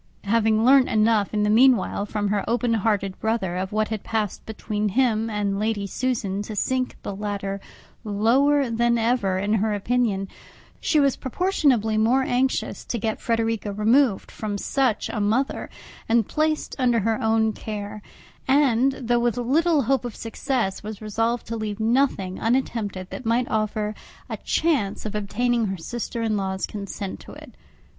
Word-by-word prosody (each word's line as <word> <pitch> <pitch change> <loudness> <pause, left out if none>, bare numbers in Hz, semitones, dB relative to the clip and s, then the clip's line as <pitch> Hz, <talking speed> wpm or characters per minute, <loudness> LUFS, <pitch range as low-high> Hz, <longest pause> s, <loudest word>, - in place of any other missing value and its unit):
Having 220 +1 +2
learnt 265 0 +6
enough, 215 -1 +2
in 210 -1 0
the 210 - +2
meanwhile, 230 -3 +4
from 205 -1 -1
her 205 -1 0
open 240 0 +1
hearted 200 -3 0
brother, 220 -5 -1
of 185 +1 -3
what 215 0 0
had 220 -3 -4
passed 215 -4 -2
between 215 -1 -2
him 225 0 +1
and 205 -2 -1
Lady 210 -1 -1
Susan 205 -2 -2
to 210 +1 -6
sink 255 +4 -1
the 200 - -4
latter 200 -1 -4 0.4
lower 250 +6 +2
than 235 +1 +2
ever 225 -5 +1
in 205 +3 0
her 215 0 +1
opinion, 205 -2 0 0.5
she 310 - +2
was 280 -2 +3
proportionably 260 - +1
more 245 +5 +3
anxious 260 +1 0
to 240 - -3
get 220 0 -2
Frederica 225 -2 -1
removed 220 +2 +2
from 210 -2 -4
such 255 0 0
a 215 - -3
mother, 225 +7 0 0.4
and 230 -2 +3
placed 310 0 -1
under 240 -3 +3
her 220 +1 0
own 220 0 +2
care; 210 -1 -6 0.5
and, 270 -1 +3
though 240 -2 0
with 240 -1 0
little 295 +5 +2
hope 270 +3 +1
of 240 -3 -6
success, 225 -3 -2
was 215 -1 -7
resolved 225 +2 -1
to 230 - -4
leave 215 -2 -4
nothing 220 -5 +1
unattempted 225 -6 -1
that - - -6
might 235 +2 +1
offer 215 -1 -1 0.4
a - - -4
chance 280 -14 0
of 215 - -4
obtaining 230 +3 0
her 190 0 -3
sister 230 +6 -4
in 220 -1 0
law's 190 -1 -2
consent 200 -1 -6
to - - -12
it. - - -12
220 Hz, 165 wpm, -24 LUFS, 205-245 Hz, 0.5 s, learnt